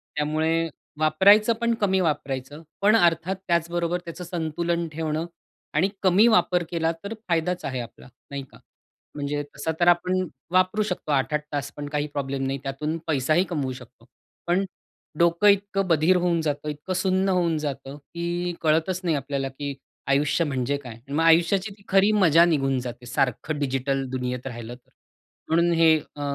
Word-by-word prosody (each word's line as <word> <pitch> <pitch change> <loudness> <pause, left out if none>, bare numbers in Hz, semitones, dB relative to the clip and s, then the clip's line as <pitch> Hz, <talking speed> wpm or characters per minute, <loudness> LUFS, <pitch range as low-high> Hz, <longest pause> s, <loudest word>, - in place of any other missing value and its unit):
त्यामुळे 160 +2 0 0.3
वापरायचं, 200 +9 +5
पण 235 0 +2
कमी 190 -2 +2
वापरायचं. 145 -2 -3 0.2
पण 210 +2 +5
अर्थात 170 -2 +2
त्याचबरोबर 170 +1 0
त्याचं 170 +2 -7
संतुलन 170 0 -2
ठेवणं 160 +1 -2 0.5
आणि 180 +6 +2
कमी 190 +5 +5
वापर 180 -5 +3
केला, 165 -1 +1
तर 200 - -4
फायदाच 175 +1 0
आहे 130 -2 -3
आपला, 115 - -11 0.2
नाही 140 -1 -4
का? - - -15 0.6
म्हणजे 145 0 -2
तसा 160 - -2
तर 175 - +3
आपण 180 +1 +3 0.2
वापरू 185 +3 +2
शकतो, 180 -6 -4
8-8 145 +2 +1
तास 145 0 -3
पण 145 0 -5
काही 150 0 -1
प्रॉब्लेम 135 -1 -2
नाही, 135 +1 -2
त्यातून 150 +4 -3
पैसाही 155 +4 +2
कमवू 145 -6 -2
शकतो. 125 -2 -14 0.4
पण 180 +3 +2 0.6
डोकं 170 +4 +4
इतकं 200 -1 +2
बधीर 165 +2 +4
होऊन 175 -2 +1
जातं, 150 -1 -2
इतकं 150 +5 -5
सुन्न 190 +1 +1
होऊन 175 -3 +1
जातं, 140 -2 -5
की 170 +4 -4
कळतच 165 +4 +1
नाही 165 -3 +1
आपल्याला, 140 -1 -2
की 140 +1 -5 0.3
आयुष्य 145 +4 +2
म्हणजे 135 0 -1
काय? 125 -5 -9
आणि 135 +5 -11
मग 165 - +2
आयुष्याची 170 +5 +3 0.2
खरी 195 +2 +4
मजा 170 -5 +5
निघून 135 -5 +1
जाते, 125 0 -7
सारखं 135 +4 -1
डिजिटल 135 0 -1
दुनियेत 125 0 -3
राहिलं 120 -1 -7
तर. 125 - -25 0.6
म्हणून 170 +2 +3
हे 165 -1 +5 0.2
अ, 145 - -8
160 Hz, 160 wpm, -25 LUFS, 140-175 Hz, 0.6 s, वापरायचं